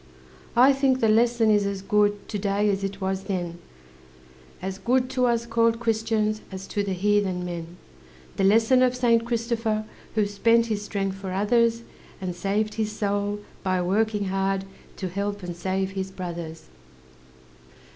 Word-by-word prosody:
I 255 +4 +7
think 270 -1 +2
the 225 - +3
lesson 230 0 +4
is 205 -1 +4
as 195 -1 -4
good 205 0 +1
To 205 - -3
day 205 +1 +1
as 195 0 -2
it 195 0 -3
was 190 0 -2
then 175 -3 -3 1.0
As 190 +1 -5
good 250 +4 +1
to 255 -1 +2
us 235 -1 +1
called 230 0 +2
Christians 220 -2 0
As 190 0 -6
to 205 - -1
the 200 -1 -2
heathen 190 -1 +1
men 170 0 -6 0.6
The 195 - +1
lesson 225 +6 +5
of 255 -1 +3
Saint 230 -2 +3
Christopher, 230 -2 -1 0.3
Who 215 -2 +3
spent 230 +3 +3
his 215 -3 -2
strength 195 -2 -2
for 195 -1 -6
others, 230 +4 +2 0.4
And 185 -2 -4
saved 205 +4 -1
his 215 -1 -1
soul 205 0 -1 0.2
by 185 -1 0
working 205 +3 +1
hard 195 0 0 0.3
To 190 - -3
help 200 +2 -3
and 175 -1 -5
save 190 +2 -1
his 190 -1 -4
brothers! 170 -3 -6
205 Hz, 160 wpm, -25 LUFS, 190-230 Hz, 1.0 s, I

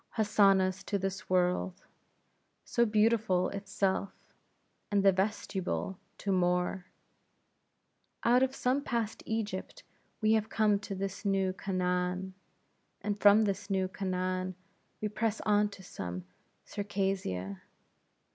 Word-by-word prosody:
Hosannahs 195 -3 +4
to 200 - 0
this 195 +1 -4
world! 180 0 +1 0.8
so 235 -1 +2
beautiful 210 -4 +3
itself, 200 -1 -1 0.8
and 200 -2 +2
the 195 - +7
vestibule 190 -1 -2 0.2
to 200 - -2
more. 180 0 +1 1.4
Out 245 +2 +5
of 265 0 +1
some 255 +3 +1
past 230 -5 -2
Egypt, 215 -4 -3 0.4
we 215 -1 +3
have 220 -1 +1
come 210 -2 +3
to 200 -1 -6
this 195 +1 -4
new 195 -2 +1
Canaan; 180 0 -1 0.7
and 205 -1 -1
from 205 +2 +7
this 200 0 -2
new 190 -1 +1
Canaan, 185 -1 -2 0.5
we 215 - 0
press 215 +1 -1
on 210 0 +3
to 200 -2 -12
some 90 - -6 0.4
Circassia. 190 - -2
195 Hz, 115 wpm, -31 LUFS, 185-210 Hz, 1.4 s, the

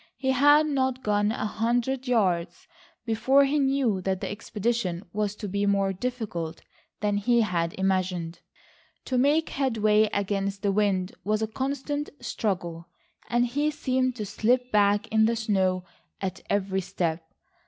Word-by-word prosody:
He 265 -1 0
had 290 +4 +5
not 265 -3 0
gone 205 0 +2
a 215 - -3
hundred 240 +4 -1
yards 185 -8 0 0.4
before 260 +5 +4
he 290 +2 +1
knew 270 -8 +1
that 190 0 -1
the - - -4
expedition 205 -3 -2
was 210 -1 -1
to 210 - -6
be 200 +1 -1
more 195 -1 +2
difficult 190 -8 -4 0.4
than 205 -1 +1
he 235 +3 +3
had 170 -5 -1
imagined. 185 -3 -1 0.7
To 255 -2 0
make 295 +5 +3
headway 220 -5 +2
against 200 0 -2
the 200 - +2
wind 195 -2 +1
was 215 +1 0
a - - 0
constant 280 +4 -3
struggle, 175 -5 -3 0.4
and 240 +1 +2
he 290 +5 0
seemed 260 -4 0
to 215 -4 -4
slip 245 +5 +1
back 205 0 +3
in 220 0 +4
the 230 +1 +2
snow 190 -5 0 0.4
at 190 -1 -4
every 195 -1 0
step. 170 -2 -2
210 Hz, 150 wpm, -26 LUFS, 195-255 Hz, 0.7 s, had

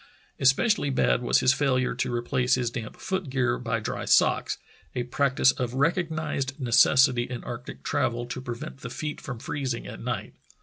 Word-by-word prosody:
Especially 145 - +3
bad 130 -2 +2
was - - +3
his 130 - +5
failure 130 -3 +1
to 125 0 -2
replace 125 +1 +1
his 125 -2 -1
damp 115 -2 -6
foot 190 -5 -3
gear 125 -2 0
by 115 -1 -1
dry 105 - -4
socks - - +3 0.2
— - - -31
a 125 - 0
practice 130 +1 +3
of 125 -1 -4
rec 145 +6 +3
ognized 155 -6 -3
necessity 125 0 +5
in 125 -2 -5
arctic 125 0 -8
travel 120 -4 0
to 125 +1 -6
prevent 120 +1 -6
the 125 - -7
feet 150 +5 -5
from 125 -4 -6
freezing 130 0 -3
at - - -8
night. - - -4
130 Hz, 180 wpm, -26 LUFS, 120-140 Hz, 0.2 s, his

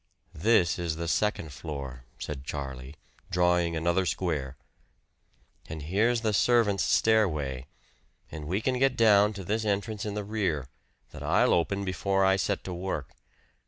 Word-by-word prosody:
"This 90 0 +2
is 85 -2 -2
the 85 +1 -4
second 85 -5 0
floor," 70 -5 -7
said 70 -3 -6
Charlie, 70 -1 -6 0.3
drawing 90 -1 +2
another 85 +3 +1
square. 75 -9 -2 1.1
"And 80 -2 -6
here's 110 +9 +1
the 110 -2 0
servant's 105 -3 +3
stairway, 75 - +1 0.6
and 80 -1 -7
we 95 +6 -1
can 125 +1 0
get 135 -1 +2
down 105 -2 +5
to 100 -2 -7
this 110 +5 -1
entrance 105 0 -2
in 105 -1 -4
the 105 - -2
rear, 95 - -1 0.4
that - - -10
I'll - - +3
open 100 +4 0
before 95 +1 +1
I 95 0 +4
set 100 0 -1
to 90 - -5
work. 85 -6 -4
90 Hz, 150 wpm, -28 LUFS, 75-105 Hz, 1.1 s, down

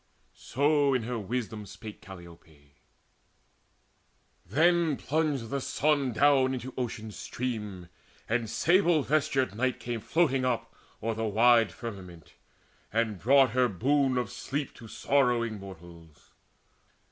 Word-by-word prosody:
So 145 0 +1
in 125 - 0
her 120 +1 -3
wisdom 110 0 -4
spake 110 +2 -10
Calliope. 85 -6 -14 1.7
Then 160 - +2
plunged 145 -6 -1
the 140 - -1
sun 140 -1 +1
down 130 +1 +3
into 130 +1 -7
Ocean's 110 -4 -5
stream, 105 -7 -5 0.4
And 115 -1 -1
sable 175 - +3
vestured 140 -7 +1
Night 125 +3 -1
came 120 -1 -4
floating 135 +1 +1
up 125 -2 -2 0.3
O'er 115 0 0
the 110 +1 -3
wide 115 +1 +4
firmament, 95 -8 -9 0.6
and 110 -3 -1
brought 135 +2 +5
her 125 +1 +3
boon 130 +5 +1
Of 120 -5 -2
sleep 140 0 -4
to 115 - -11
sorrowing 120 -3 +1
mortals. 85 -4 -13
120 Hz, 120 wpm, -28 LUFS, 105-140 Hz, 1.7 s, brought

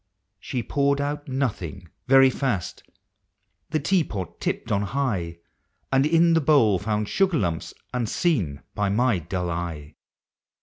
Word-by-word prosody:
She 125 -2 -4
poured 140 +4 +1
out 145 +1 -3
nothing, 105 - -3 0.2
very 135 0 +7
fast 125 - -2 0.5
— - - -50
the 155 - 0
tea 175 +4 +2
pot 95 - -6
tipped - - -2
on 100 - +2
high, 100 -7 -2 0.3
— - - -47
And 135 +2 +4
in 165 +1 +4
the 165 - +3
bowl 135 - +4
found 105 0 -1
sugar 190 - +2
lumps 85 - -2 0.2
unseen 115 - 0
by 105 -1 0
my 115 -1 +2
dull 90 +2 -3 0.2
eve. 75 -1 -11
125 Hz, 145 wpm, -24 LUFS, 95-140 Hz, 0.5 s, very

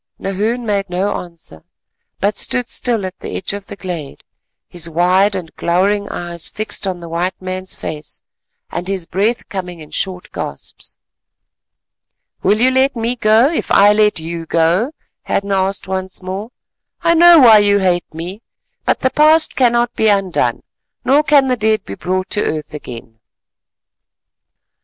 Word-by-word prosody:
Nahoon 215 +5 -2
made 200 -3 -1
no 190 +3 -1
answer, 165 - -11 0.6
but 205 +1 +1
stood 250 +3 0
still 230 -4 0
at 185 0 -7
the - - -5
edge 190 - -3
of 200 -1 -7
the - - -8
glade, 175 -8 -6 0.4
his 170 -1 -5
wild 185 +5 +3
and 175 -4 -6
glowering 200 +4 +1
eyes 170 -1 -5
fixed 215 -1 -3
on 185 -2 -3
the 170 - -9
white 170 +3 -2
man's 185 0 -5
face 150 -1 -7 0.5
and 175 +1 -4
his 190 -3 -2
breath 205 +8 -1
coming 180 -3 -6
in 155 -1 -12
short 185 -2 -2
gasps. - - -6 1.4
"Will 210 +2 +2
you 255 +2 +4
let 265 +1 +2
me 230 +1 -1
go, 225 +1 +4
if - - -2
I 205 +1 +6
let 210 -3 +3
you 165 0 -6
go?" 170 - +2 0.3
Hadden 200 0 -2
asked 195 0 0
once 190 0 -4
more. 190 +4 -5 0.5
"I 335 0 +4
know 340 +1 +8
why 230 -7 +8
you 205 0 +3
hate 180 -3 0
me, 175 +7 -7 0.4
but - - +1
the 260 - +1
past 310 +1 +4
cannot 240 -1 +2
be 220 - +2
undone, 195 -4 +1 0.4
nor 280 +3 +5
can 290 -3 +4
the 255 - +2
dead 220 -1 0
be 100 - -7
brought 185 - -3
to 210 - +2
earth 155 -1 -3
again." 115 -6 -9
195 Hz, 160 wpm, -17 LUFS, 175-220 Hz, 1.4 s, know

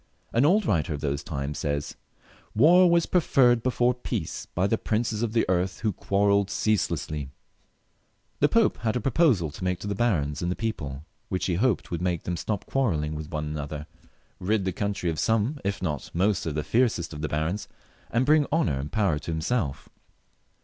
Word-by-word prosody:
An 120 +4 +4
old 200 +4 +3
writer 80 - +1
of 70 - -7
those 70 +1 -2
times 70 -2 -4
says, 70 0 -2 0.3
" - - -29 0.3
War 175 - +6
was 170 -1 +3
preferred 125 -9 +3
before 125 0 +2
peace 115 -8 -4
by 90 - -1
the 100 - +2
princes 110 0 -1
of 115 -2 -1
the 115 - +2
earth, 90 0 0
who 110 -3 0
quarrelled 100 +1 +2
ceaselessly." 75 -10 -1 1.1
The 145 - +4
Pope 230 -2 +3
had 110 -2 -1
a - - +1
pro 130 +4 -1
posal 110 - +3
to 90 - -8
make 90 -1 0
to - - -6
the 100 - -1
barons 85 - 0
and 90 +1 -1
people, 75 - -4 0.2
which 90 - -1
he 90 - 0
hoped 105 +2 0
would 85 -1 -2
make 90 -2 -1
them 90 - -2
stop 100 +4 -3
quarrelling 80 - 0
with 75 0 -6
one 75 -2 -3
another, 75 0 -5 0.5
rid 100 +1 0
the 95 - 0
country 100 -4 -1
of 80 - -4
some 115 +6 +1
if 100 -1 -2
not 75 -6 -3
most 95 0 +1
of 75 - -2
the 75 - -1
fiercest 110 -8 +1
of 75 - -7
the 75 - -2
barons, 80 +7 -2 0.4
and 120 +3 +1
briug 150 0 +4
honour 85 - +1
and 70 +2 -5
power 95 -8 +1
to 80 - -8
himself. 80 - -1
95 Hz, 195 wpm, -26 LUFS, 80-115 Hz, 1.1 s, War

